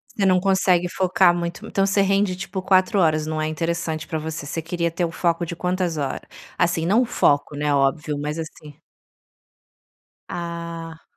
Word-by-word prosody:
Você 195 -2 +2
não 185 -1 +4
consegue 185 -2 +2
focar 185 0 +3
muito, 170 0 -4
então, 195 0 +1
você 200 +1 +3
rende 195 -1 +2
tipo 190 0 -5
4 190 +3 +3
horas, 155 -3 +2
não 155 0 -2
é 155 - 0
interessante 165 0 -2
pra 160 - -2
você. 155 -2 -5
Você 160 +3 -3
queria 170 0 -2
ter 175 +1 0
o 165 - -4
foco 170 0 0
de 170 0 -4
quantas 180 -2 -1
hora? 140 -2 -2 0.3
Assim, 170 -2 +1
não 210 +8 +4
o - - +2
foco, 145 -9 +1
né, 145 0 0
óbvio, 145 +2 +1
mas 150 +2 -3
assim 155 -2 -8 1.5
Ah. 170 -1 -6
170 Hz, 175 wpm, -23 LUFS, 155-185 Hz, 1.5 s, não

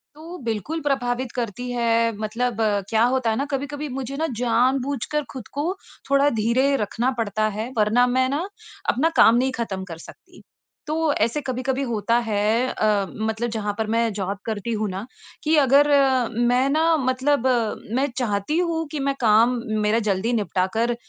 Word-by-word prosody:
तो 330 +4 -9
बिल्कुल 230 +8 -3
प्रभावित 255 -3 -1
करती 245 0 -4
है 230 -1 +2
मतलब 225 +2 -2 0.3
क्या 220 0 +3
होता 255 -3 +1
है 220 - +1
ना 275 - -1
कभी-कभी 285 +2 -3
मुझे 270 +1 -5
न 325 - +1
जान-बूझकर 260 +4 0
ख़ुद 255 -5 -8
को 305 +5 0 0.4
थोड़ा 280 +1 +4
धीरे 260 +5 +2
रखना 235 +5 -1
पड़ता 215 -1 0
है 225 +4 -4
वरना 220 +4 +3
मैं 260 0 +3
न 315 +5 -1 0.4
अपना 305 +7 +2
काम 225 - +7
नहीं 260 +2 +1
ख़त्म 190 -4 -3
कर - - -9
सकती। - - -16 0.5
तो 315 0 +1
ऐसे 235 +7 +1
कभी-कभी 260 +1 -1
होता 230 0 0
है 205 -2 0 0.2
अ, 210 -4 +1
मतलब 220 +2 -2
जहाँ 210 -2 -2
पर 220 -1 -1
मैं 230 -1 +2
जॉब 200 0 -3
करती 220 0 -3
हूँ 215 -1 -1
ना 190 +3 -5 0.4
कि 310 +1 +3
अगर 280 +2 +5 0.6
मैं 255 +2 +2
न 300 +3 +1 0.3
मतलब 260 +1 +1 0.5
मैं 270 +2 +2
चाहती 220 +3 -1
हूँ 335 -2 0
कि 305 - -3
मैं 275 0 0
काम 225 +1 +5 0.3
मेरा 210 +2 +2
जल्दी 200 +4 0
निपटा 200 -4 0
कर 235 +2 +1
240 Hz, 170 wpm, -23 LUFS, 220-275 Hz, 0.6 s, काम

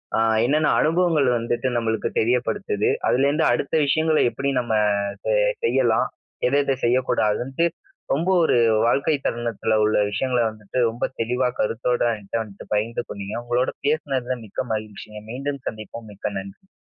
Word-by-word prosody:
அ - - +1 0.3
என்னன்ன 150 +3 +2
அனுபவங்கள் 165 -3 +2
வந்துட்டு 120 +2 -1
நம்மளுக்கு 110 -2 -1
தெரியப்படுத்துது, 125 - 0 0.2
அதுலருந்து 140 +5 +2
அடுத்த 130 +5 -1
விஷயங்கள 155 +2 +2
எப்டி 140 +3 -2
நம்ம 120 -2 -2 0.5
ச - - +1 0.3
செய்யலாம். - - +2 0.4
ஏதத 140 0 +2
செய்யக்கூடாதுனுட்டு, 125 +3 +1 0.5
ரொம்ப 165 +7 0
ஒரு 125 - +3 0.3
வாழ்க்கை 140 +5 +2
தருணத்துல 115 -1 -1
உள்ள 110 - +2
விஷயங்கள 125 +3 0
வந்துட்டு, 110 +1 -8
ரொம்ப 115 +2 -2 0.2
தெளிவா 125 +2 +1
கருத்தோட 120 +3 0 0.2
என்கிட்ட 105 +2 -3
வந்துட்டு 100 -1 -13
பகிர்ந்து 115 +3 -1
கொண்டீங்க. 100 +1 -6
உங்களோட 120 +2 +1 0.2
பேசுனதுல 130 -5 -1
மிக்க 105 - -4
மகிழ்ச்சிங்க. 105 0 -6
மீண்டும் 140 +1 -4
சந்திப்போம் 110 +1 -7
மிக்க 100 0 -5
நன்றி. 100 - -11
120 Hz, 130 wpm, -23 LUFS, 110-140 Hz, 0.5 s, ஒரு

